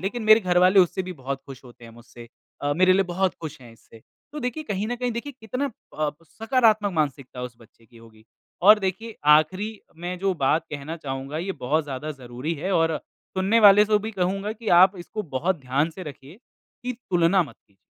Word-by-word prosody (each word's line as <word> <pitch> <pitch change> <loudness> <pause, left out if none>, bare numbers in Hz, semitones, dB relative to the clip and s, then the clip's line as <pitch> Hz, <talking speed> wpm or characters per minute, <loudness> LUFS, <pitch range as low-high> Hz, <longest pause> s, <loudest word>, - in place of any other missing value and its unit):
लेकिन 215 +5 -3
मेरे 215 +1 +7
घर 180 -2 +2
वाले 185 +2 +6
उससे 185 +1 +1
भी 185 0 -6
बहुत 135 -2 -5
खुश 135 -1 -11
होते 120 -1 -15
हैं 115 - -11
मुझसे 120 0 -14 0.4
अ, 145 - +1
मेरे 185 +1 +5
लिए 195 - +4
बहुत 185 +1 -1
खुश 155 -4 -7
है 120 -2 -14
इससे। 115 0 -18 0.3
तो 300 - -6
देखिए 250 +5 -3
कहीं 205 -2 -2
न 245 - -2
कहीं 250 0 -2
देखिए 255 +5 -5
कितना 250 +6 -3
प 235 - -15 0.2
अ, 150 -1 +1
सकारात्मक 220 - +1
मानसिकता 140 -5 -2
उस 125 -2 -6
बच्चे 115 0 -21
की 115 - -21
होगी, 110 -1 -18 0.4
और 210 +2 +8
देखिए 200 +4 -4 0.2
आख़िरी 185 +8 +2 0.3
में 175 +1 -5
जो 195 0 +1
बात 155 +2 +1
कहना 150 +3 -6
चाहूँगा 135 0 -5
ये 190 +4 -3
बहुत 150 +1 -1
ज़्यादा 145 +2 -5
ज़रूरी 130 +4 -5
है 180 +6 -3
और 165 -3 +2 0.4
सुनने 195 +5 +3
वाले 205 0 +8
को 210 0 +2
भी 220 +2 -5
कहूँगा 195 +2 -1
कि 225 0 -7
आप 185 +1 +7
इसको 210 +5 -6
बहुत 165 +1 -2
ध्यान 135 +5 0
से 185 - -9
रखिए, 145 0 -10 0.5
कि 250 - -2 0.2
तुलना 175 +2 +4
मत 150 - -11
कीजिए। 100 -1 -34
175 Hz, 210 wpm, -24 LUFS, 140-205 Hz, 0.5 s, और